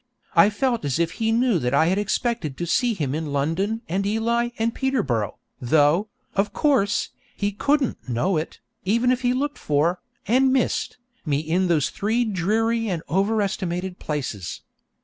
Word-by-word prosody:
I 170 +4 +7
felt 240 - 0
as 140 -3 0
if 170 0 +1
he 225 +4 -1
knew 230 -4 +2
that 125 0 0
I 160 - +4
had 190 +4 +2
expected 210 - -1
to 175 - -2
see 235 +6 +1
him 145 -7 -2
in 155 -1 -3
London 180 - -1
and 190 +4 -1
Ely 230 +3 +1
and 225 0 0
Peterborough, 140 - -1 0.2
though, 150 - +3 0.3
of 200 +1 +1
course, 265 -10 +2 0.3
he 205 0 0
couldn't 275 - 0
know 125 +11 +1
it, 155 +1 -3 0.3
even 235 +6 +2
if 255 0 0
he 245 -1 +2
looked 280 +3 -2
for, 155 +5 +1 0.3
and 260 +4 +4
missed, 260 -1 0 0.3
me 145 -4 0
in 165 +5 0
those 160 -6 +1
three 225 +4 0
dreary 220 +3 0
and 170 -3 -2
over 200 +6 +2
estimated 185 -2 -3
places. 130 - -4
195 Hz, 170 wpm, -23 LUFS, 160-230 Hz, 0.3 s, I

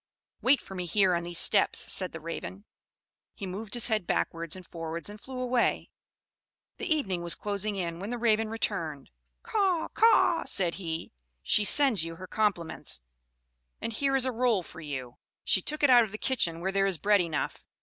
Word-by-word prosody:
"Wait 265 +2 +4
for - - -11
me 180 -2 -4
here 190 0 +3
on 170 - 0
these 175 0 -4
steps," 200 - +3 0.2
said 185 -2 +3
the 165 - -8
Raven. 165 +5 -7 0.7
He 200 - -6
moved 195 +4 -4
his 240 - +2
head 215 -6 +1
backwards 165 - -1
and 185 -1 -11
forwards 165 +3 -6
and 210 - -12
flew 260 -1 -7
away. 250 -1 0 0.9
The - - -5
evening 195 - 0
was 170 -1 +1
closing 205 0 -2
in 170 -3 -3
when 200 +3 -5
the 245 - -3
Raven 225 -2 +1
returned. 165 -10 -3 0.3
"Caw 385 -6 0
caw!" 440 -6 +4
said 175 -4 +1
he. 165 -2 -5 0.3
"She 210 - +3
sends 260 - +5
you 165 0 -6
her 185 - -9
compliments; 185 - -1 0.8
and 230 - -4
here 275 +4 0
is 265 -1 +4
a 260 - 0
roll 235 -5 +1
for 165 - -10
you. 130 -5 -6 0.3
She 190 - +3
took 300 +9 -2
it 280 - +6
out 240 -1 +8
of 215 - -5
the 215 - -6
kitchen, 170 -11 0
where 190 +2 -1
there 195 0 +2
is 190 -3 0
bread 205 +2 +3
enough. 160 -5 -3
195 Hz, 190 wpm, -28 LUFS, 170-235 Hz, 0.9 s, out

